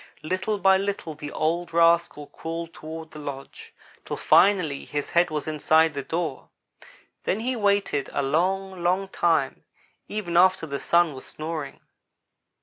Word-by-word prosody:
Little 185 +6 -1
by 195 -1 +5
little 195 -4 -3
the 145 0 -8
old 170 +2 -1
rascal 170 -3 +3
crawled 165 +2 -6
toward 160 0 -8
the 155 - -10
lodge, 140 -2 -8 0.3
till - - -5
finally 180 -8 +3
his 145 -1 -4
head 175 +1 +3
was 155 -1 -4
inside 155 +1 +3
the 140 - -3
door. 160 -1 -4 0.7
Then 205 - -1
he 255 +2 -1
waited 200 - +1
a 140 - -1
long, 185 +6 0
long 185 +3 +1
time, 160 -8 0 0.4
even 180 -5 -2
after 185 -1 +4
the 140 -2 -4
Sun 170 -2 +3
was 130 - -10
snoring. 155 -2 -6
165 Hz, 145 wpm, -25 LUFS, 155-185 Hz, 0.7 s, by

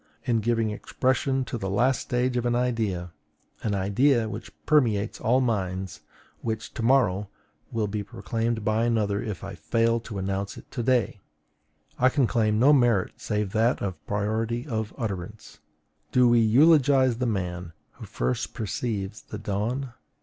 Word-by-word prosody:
In 120 -4 +1
giving 115 0 0
expression 130 +4 0
to 120 - -5
the 95 - -3
last 120 +6 +2
stage 125 0 -1
of 120 0 0
an 120 - +1
idea, 110 -8 -1 0.5
an 105 -2 -1
idea 110 +5 +2
which - - -7
permeates 115 -9 +2
all 125 +4 +3
minds, 95 -6 -2 0.4
which 110 -1 -4
to - - -5
morrow 110 -6 +2 0.4
will 115 -3 0
be 105 +1 -3
proclaimed 115 +2 -3
by 110 +2 +2
another 105 -4 +1
if 105 -5 -5
I 100 0 -6
fail 115 +8 +1
to 110 -3 -8
announce 95 +1 -3
it - - -13
to 120 - -3
day, 120 -4 +1 0.8
I 130 - +5
can 135 0 +2
claim 110 -2 +1
no 135 +6 +6
merit 120 -8 +3
save 105 -3 -2
that 115 +4 +2
of 95 -5 -4
priority 110 +4 -1
of 110 -6 -3
utterance. 100 -7 -6 0.5
Do 125 -1 +5
we 120 0 +5
eulogize 130 +1 +5
the 125 - 0
man 90 -5 -3 0.2
who - - -11
first 60 0 -2
perceives 105 -2 -3
the 105 - -8
dawn? 120 +7 -3
110 Hz, 155 wpm, -26 LUFS, 100-125 Hz, 0.8 s, no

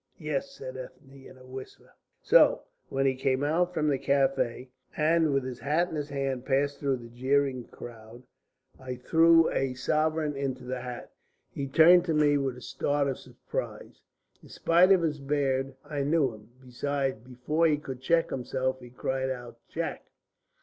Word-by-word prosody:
"Yes," - - -3
said - - -8
Ethne, 140 - -11
in 130 - -15
a 130 - -16
whisper. 130 0 -11 0.3
"So, - - +5 0.3
when 135 0 0
he 135 - +3
came 130 +1 0
out 170 +4 +1
from 155 -3 -1
the 140 -3 +1
café, 135 -3 0 0.3
and 160 0 +3
with 135 -1 +1
his 125 -2 -6
hat 155 +6 +1
in - - -6
his 145 -1 -3
hand 135 -3 -2
passed 140 +1 0
through 135 -2 0
the 120 -1 -11
jeering 130 +1 0
crowd, 115 +1 -12 0.6
I 130 -1 -6
threw 165 +5 +4
a 135 -1 -1
sovereign 155 +3 0
into 135 -2 -3
the 125 0 -4
hat. 125 -1 -7 0.4
He 140 - -4
turned 170 +5 +6
to 165 -3 0
me 145 -1 +4
with 135 -2 -2
a - - -11
start 145 +2 -1
of 135 - -3
surprise. - - -7 0.4
In - - -16
spite 175 +3 +4
of 185 -3 +5
his 150 -2 -1
beard 135 -1 -1
I 145 -1 -3
knew 140 -3 +2
him. 105 0 -15
Besides, 135 0 -2
before 130 +7 0
he 150 -2 +2
could 130 -3 -8
check 165 +4 +2
himself, 130 0 -2
he 125 -1 -12
cried 130 +2 -2
out 120 -2 -7
'Jack!'" - - -4
135 Hz, 175 wpm, -28 LUFS, 130-150 Hz, 0.6 s, turned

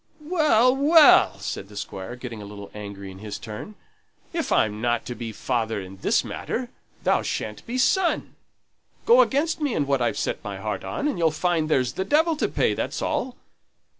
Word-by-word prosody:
"Well, 295 -7 +4
well!" 300 +3 +6
said 100 - -5
the 105 - -11
Squire, 95 +2 -6
getting 120 -3 -7
a - - -8
little 100 0 -10
angry 100 -2 -8
in 95 - -12
his 105 0 -6
turn. 110 - -8 0.6
"If 330 -2 -2
I'm 105 0 +2
not 120 -1 0
to 125 - -4
be 115 -2 -6
father 115 -1 -2
in 95 0 -9
this - - +1
matter, 245 0 -4 0.3
thou - - +3
sha'n't - - -4
be 245 +2 -3
son. 350 +7 +1 0.7
Go 480 +2 +7
against 320 - +1
me 285 -6 0
in 145 - +1
what 140 -2 +1
I've 120 - 0
set - - -2
my - - -5
heart - - -4
on, 290 - -2
and 245 -12 -2
you'll 165 -1 +4
find 160 0 0
there's 130 -5 +1
the 190 - -2
devil 320 - +2
to - - +1
pay, - - +1
that's - - -3
all. 255 0 -2
150 Hz, 195 wpm, -24 LUFS, -, 0.7 s, Go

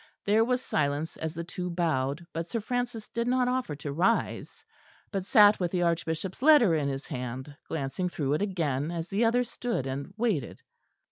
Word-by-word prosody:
There 215 +2 +4
was 250 +2 0
silence 145 +1 -1
as 160 +1 -4
the 170 - -3
two 180 +1 -5
bowed, 160 -3 -1
but 165 +1 -3
Sir 230 - -1
Francis 240 0 -3
did 235 0 -2
not 250 0 +2
offer 250 - -1
to 145 -1 -5
rise, 190 +10 0 0.5
but 195 -2 -3
sat 210 0 +7
with 175 -2 0
the 175 0 0
Archbishop's 170 +3 -1
letter 275 - +6
in 150 -3 +1
his 135 0 -4
hand, 130 +1 -5
glancing 160 +4 -2
through 145 -5 -1
it 150 - 0
again, 160 -8 -1
as 170 0 -4
the 205 +4 +1
other 240 +2 +3
stood 240 - -3
and 135 +5 -4
waited. 215 - -1
175 Hz, 185 wpm, -28 LUFS, 150-225 Hz, 0.5 s, sat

